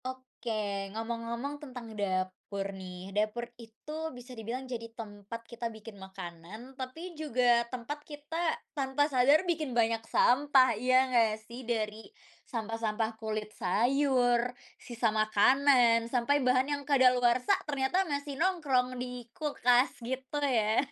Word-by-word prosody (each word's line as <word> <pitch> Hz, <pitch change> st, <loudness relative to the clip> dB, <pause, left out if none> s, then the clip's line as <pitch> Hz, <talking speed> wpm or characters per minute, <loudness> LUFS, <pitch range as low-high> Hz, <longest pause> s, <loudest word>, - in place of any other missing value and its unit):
Oke, 220 Hz, -6 st, -4 dB
ngomong-ngomong 235 Hz, +5 st, -4 dB
tentang 250 Hz, -6 st, -8 dB
dapur 195 Hz, 0 st, -3 dB
nih, 185 Hz, 0 st, -8 dB
dapur 215 Hz, +3 st, 0 dB, 0.2 s
itu 305 Hz, +8 st, -6 dB
bisa 245 Hz, +1 st, -11 dB
dibilang 240 Hz, +3 st, -5 dB
jadi 235 Hz, -3 st, -6 dB
tempat 215 Hz, +1 st, -8 dB
kita 235 Hz, 0 st, -5 dB
bikin 220 Hz, -2 st, -11 dB
makanan, 190 Hz, +5 st, -9 dB
tapi 270 Hz, +7 st, -7 dB
juga 245 Hz, -6 st, +2 dB
tempat 255 Hz, +4 st, -5 dB
kita 310 Hz, +3 st, -3 dB, 0.2 s
tanpa 275 Hz, 0 st, +1 dB
sadar 285 Hz, +4 st, +4 dB
bikin 310 Hz, -8 st, -1 dB
banyak 225 Hz, -1 st, +2 dB
sampah, 260 Hz, -1 st, +4 dB
iya 255 Hz, +4 st, +3 dB
enggak 225 Hz, -4 st, +2 dB
sih? 235 Hz, +3 st, -9 dB
Dari 220 Hz, -, -2 dB, 0.4 s
sampah-sampah 225 Hz, -1 st, -2 dB
kulit 215 Hz, -1 st, -3 dB
sayur, 245 Hz, +3 st, +2 dB, 0.3 s
sisa 235 Hz, -2 st, -1 dB
makanan, 230 Hz, +2 st, +4 dB
sampai 260 Hz, +4 st, +2 dB
bahan 255 Hz, +3 st, +2 dB
yang 285 Hz, 0 st, -3 dB
kadaluarsa 255 Hz, +6 st, +4 dB
ternyata 280 Hz, +6 st, +1 dB
masih 285 Hz, 0 st, -3 dB
nongkrong 270 Hz, -9 st, +1 dB
di 250 Hz, -1 st, -6 dB
kulkas, 255 Hz, -5 st, +2 dB
gitu 260 Hz, +4 st, -4 dB
ya. 225 Hz, -6 st, +2 dB
245 Hz, 125 wpm, -30 LUFS, 220-270 Hz, 0.4 s, sadar